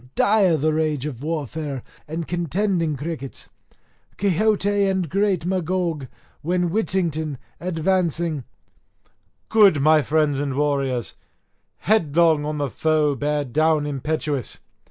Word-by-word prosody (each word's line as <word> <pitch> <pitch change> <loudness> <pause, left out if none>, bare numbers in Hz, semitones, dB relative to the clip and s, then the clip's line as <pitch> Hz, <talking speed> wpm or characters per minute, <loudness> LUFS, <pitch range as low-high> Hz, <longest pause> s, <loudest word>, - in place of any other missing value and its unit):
Dire 200 -5 +4
the 155 +2 +1
rage 155 -3 0
of 130 -5 -5
warfare 150 -3 -4 0.2
and 160 +1 -4
contending 175 -2 0
crickets, 145 -2 -6 0.7
Quixote 205 +1 +2
and 190 -2 0
great 195 0 0
Magog; 175 -5 -1 0.3
when 175 +1 0
Whittington 165 -8 -1 0.2
advancing 170 -3 0 1.1
"Good, 205 -8 +5
my 155 +2 +5
friends 150 -2 +1
and 140 -2 -2
warriors, 140 -4 0 0.7
headlong 165 -6 +3
on 150 0 -3
the 145 -3 -2
foe 155 0 +1
bear 145 +2 -1
down 155 +3 +2
impetuous." 145 -1 -3
155 Hz, 110 wpm, -22 LUFS, 145-180 Hz, 1.1 s, Good